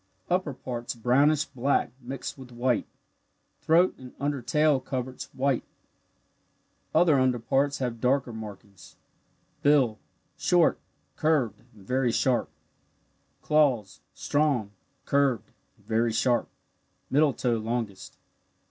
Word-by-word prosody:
Upper 175 Hz, -6 st, 0 dB
parts 120 Hz, -2 st, -5 dB
brownish 140 Hz, +6 st, +3 dB
black 135 Hz, -2 st, 0 dB
mixed 130 Hz, +2 st, -6 dB
with 130 Hz, -2 st, -12 dB
white 120 Hz, 0 st, 0 dB, 0.7 s
throat 170 Hz, +3 st, +4 dB
and 130 Hz, -1 st, -12 dB
under 140 Hz, -1 st, -1 dB
tail 150 Hz, +3 st, +2 dB
coverts 130 Hz, -1 st, -5 dB
white 135 Hz, -1 st, 0 dB, 1.3 s
other 160 Hz, -6 st, +5 dB
under 130 Hz, -1 st, +2 dB
parts 140 Hz, +4 st, +1 dB
having 120 Hz, -3 st, -3 dB
darker 125 Hz, 0 st, +1 dB
markings. 105 Hz, -3 st, -10 dB, 0.7 s
Bill 135 Hz, -7 st, +3 dB, 0.4 s
short, 175 Hz, -2 st, +3 dB, 0.4 s
curved, 140 Hz, -, +1 dB, 0.2 s
and 100 Hz, -3 st, -16 dB
very 125 Hz, +1 st, +1 dB
sharp. 125 Hz, +1 st, +1 dB, 0.9 s
Claws 135 Hz, -10 st, +2 dB
strong, 140 Hz, -9 st, 0 dB, 0.3 s
curved, 140 Hz, -4 st, +1 dB, 0.3 s
and -, -, -27 dB
very 115 Hz, +1 st, +1 dB
sharp, 120 Hz, +1 st, +1 dB, 0.6 s
middle 145 Hz, +2 st, +4 dB
toe 120 Hz, -2 st, 0 dB
longest. 110 Hz, -3 st, -4 dB
130 Hz, 110 wpm, -27 LUFS, 120-145 Hz, 1.3 s, other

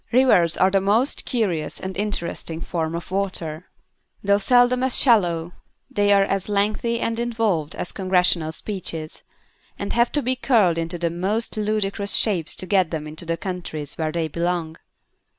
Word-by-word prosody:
Rivers 230 Hz, -10 st, +4 dB
are 190 Hz, +1 st, +4 dB
the 195 Hz, 0 st, +3 dB
most 220 Hz, +8 st, +2 dB
curious 195 Hz, -11 st, -1 dB
and 190 Hz, 0 st, -5 dB
interesting 180 Hz, -5 st, -3 dB
form 165 Hz, -1 st, -3 dB
of 170 Hz, +1 st, -7 dB
Water. 180 Hz, -4 st, -3 dB, 0.6 s
Though 200 Hz, 0 st, +3 dB
seldom 245 Hz, +3 st, +4 dB
as 260 Hz, -1 st, +2 dB
shallow, 175 Hz, -9 st, +3 dB, 0.4 s
they 205 Hz, 0 st, +2 dB
are 200 Hz, -1 st, +6 dB
as 195 Hz, 0 st, -2 dB
lengthy 215 Hz, +3 st, 0 dB
and 230 Hz, 0 st, -1 dB
involved 225 Hz, -10 st, -1 dB
as -, -, -4 dB
Congressional 180 Hz, -4 st, +1 dB
speeches, 165 Hz, -4 st, -6 dB, 0.6 s
and 200 Hz, -, -4 dB
have 235 Hz, 0 st, +2 dB
to 295 Hz, -, +1 dB
be 255 Hz, +2 st, 0 dB
curled 215 Hz, -10 st, +3 dB
into 165 Hz, +2 st, -3 dB
the 170 Hz, -1 st, -1 dB
most 195 Hz, +7 st, -2 dB
ludicrous 205 Hz, -2 st, 0 dB
shapes 185 Hz, -8 st, 0 dB
to -, -, -4 dB
get 185 Hz, -3 st, +2 dB
them 155 Hz, -2 st, -4 dB
into 155 Hz, +3 st, -8 dB
the 165 Hz, 0 st, -1 dB
countries 165 Hz, -5 st, -5 dB
where 155 Hz, -1 st, 0 dB
they 165 Hz, 0 st, -1 dB
belong. 170 Hz, 0 st, -2 dB
190 Hz, 165 wpm, -23 LUFS, 170-215 Hz, 0.6 s, are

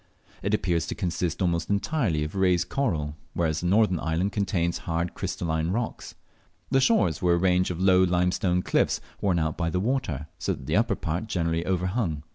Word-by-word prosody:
It 100 Hz, +3 st, +1 dB
appears 85 Hz, -5 st, 0 dB
to -, -, -3 dB
consist 90 Hz, -2 st, -2 dB
almost 85 Hz, -2 st, 0 dB
entirely 100 Hz, -, 0 dB
of 75 Hz, -, -5 dB
raised 90 Hz, -2 st, +2 dB
coral, 80 Hz, -, -1 dB, 0.2 s
whereas 80 Hz, -2 st, 0 dB
the 90 Hz, -, -2 dB
northern 100 Hz, -2 st, +3 dB
island 85 Hz, +5 st, 0 dB
contains 90 Hz, -4 st, 0 dB
hard 85 Hz, +1 st, -2 dB
crystalline 80 Hz, -1 st, -2 dB
rocks. 110 Hz, +5 st, -3 dB, 0.6 s
The 135 Hz, 0 st, +4 dB
shores 220 Hz, -, +2 dB
were 90 Hz, -2 st, +3 dB
a -, -, +1 dB
range 90 Hz, 0 st, +2 dB
of 90 Hz, -1 st, -4 dB
low 95 Hz, -1 st, +5 dB
limestone 90 Hz, 0 st, +1 dB
cliffs, -, -, +1 dB, 0.2 s
worn 95 Hz, -4 st, +2 dB
out 80 Hz, -1 st, -1 dB
by 85 Hz, -1 st, +1 dB
the 90 Hz, -, -1 dB
water, 95 Hz, -, -1 dB
so -, -, 0 dB
that 65 Hz, -, -9 dB
the -, -, -1 dB
upper -, -, +2 dB
part 85 Hz, +7 st, -3 dB
generally 85 Hz, -4 st, 0 dB
overhung. 90 Hz, -3 st, -1 dB
90 Hz, 185 wpm, -26 LUFS, 85-95 Hz, 0.6 s, low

